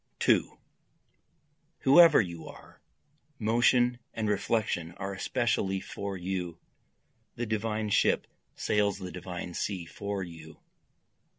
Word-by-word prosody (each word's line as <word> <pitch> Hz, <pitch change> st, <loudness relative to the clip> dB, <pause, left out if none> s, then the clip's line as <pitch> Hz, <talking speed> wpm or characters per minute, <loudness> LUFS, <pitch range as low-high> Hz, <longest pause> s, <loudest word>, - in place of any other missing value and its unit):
2 -, -, +2 dB, 1.2 s
Whoever 160 Hz, +3 st, +8 dB
you 85 Hz, -5 st, -3 dB
are! -, -, -14 dB, 0.6 s
motion 120 Hz, +2 st, +3 dB, 0.2 s
and 110 Hz, -1 st, -1 dB
reflection 105 Hz, -4 st, 0 dB
are 100 Hz, +2 st, -5 dB
especially 100 Hz, -2 st, 0 dB
for 100 Hz, 0 st, -5 dB
you, 90 Hz, -2 st, -4 dB, 0.8 s
The 120 Hz, -, -3 dB
divine 110 Hz, -1 st, -2 dB
ship -, -, +3 dB, 0.3 s
sails 105 Hz, -1 st, +1 dB
the 95 Hz, -2 st, -7 dB
divine 90 Hz, -1 st, -6 dB
sea 90 Hz, -1 st, -3 dB
for 100 Hz, +2 st, -4 dB
you. 80 Hz, -3 st, -11 dB
100 Hz, 105 wpm, -29 LUFS, 90-110 Hz, 1.2 s, Whoever